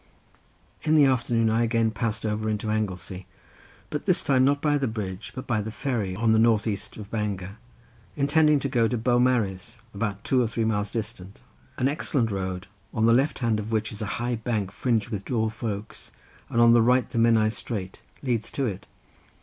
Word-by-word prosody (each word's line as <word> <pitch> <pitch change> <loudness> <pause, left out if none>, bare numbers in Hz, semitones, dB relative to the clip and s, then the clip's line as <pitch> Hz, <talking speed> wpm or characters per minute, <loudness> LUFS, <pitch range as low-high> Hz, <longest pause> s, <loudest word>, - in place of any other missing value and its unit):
In 155 0 +2
the 150 -2 +7
afternoon 120 -3 +2
I 115 +1 +2
again 115 -1 +2
passed 115 0 -2
over 110 0 -1
into 105 0 -1
Anglesey, 95 -3 -3 0.6
but - - -4
this - - +2
time 130 -2 +3
not 140 +2 +3
by 145 0 +2
the 135 - 0
bridge 100 -4 -5
but 130 - -6
by 110 -4 0
the 105 - -5
ferry 110 -5 -2
on 115 +2 +2
the 110 - +4
north 110 -2 +4
east 105 -3 -4
of 105 -1 -9
Bangor, 100 -2 -3 0.6
intending 150 +1 +4
to 140 - -1
go 120 -4 +2
to 120 - -1
Beaumaris, 120 -5 +1 0.2
about 100 -1 -3
two 130 -1 +2
or 120 - +1
three 115 0 -1
miles 105 -2 0
distant: 105 -3 -6 0.4
an 130 - +2
excellent 135 -5 0
road, 95 -1 -3 0.3
on 110 -1 +2
the 115 - +5
left 135 +5 +2
side 115 -3 +1
of 105 +1 -5
which 110 -1 0
is 105 - -8
a 105 - -2
high 120 0 -1
bank 110 -4 -2
fringed 115 0 0
with 105 -4 -4
dwarf 110 -2 -2
oaks, 105 -2 -5 0.4
and 115 - 0
on 115 0 +7
the 120 - +6
right 125 +2 +3
the 115 - -1
Menai 115 -2 +4
strait, 100 -5 -5 0.2
leads 120 -4 -1
to 140 - 0
it. 100 -5 -4
110 Hz, 200 wpm, -26 LUFS, 105-120 Hz, 0.6 s, the